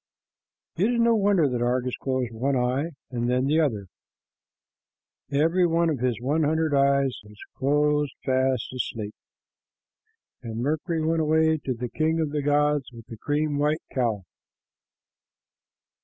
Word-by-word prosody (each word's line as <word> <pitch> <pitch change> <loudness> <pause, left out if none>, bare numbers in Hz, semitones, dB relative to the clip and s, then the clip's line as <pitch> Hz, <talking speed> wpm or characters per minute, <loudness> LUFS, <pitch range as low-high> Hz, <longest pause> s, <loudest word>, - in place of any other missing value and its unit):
It 205 +8 +2
is - - 0
no 235 0 +4
wonder 200 -7 +3
that 125 -2 -2
Argus 125 +1 0
closed 130 -3 -2
one 135 +5 0
eye 130 +5 0 0.2
and 120 -1 -1
then 125 +1 +1
the 150 +3 +2
other. 110 -10 -1 1.5
Every 165 +5 +3
one 165 0 +2
of 145 - -3
his 125 -2 0
hundred 155 +2 +1
eyes 140 -1 +3 0.5
was 150 +1 +2
fast 130 -2 0
asleep, 110 -4 -4 1.3
and 115 -3 -6
Mercury 155 +5 -1
went 165 0 +1
away 160 0 +2
to 130 - -1
the 120 +1 -4
king 160 +5 0
of 155 -3 -1
the 150 0 -1
gods 145 -1 +1
with 115 -2 -12
the 115 - -8
cream 145 +1 -1
white 150 +2 0
cow. 115 -6 -1
145 Hz, 140 wpm, -25 LUFS, 125-155 Hz, 1.5 s, no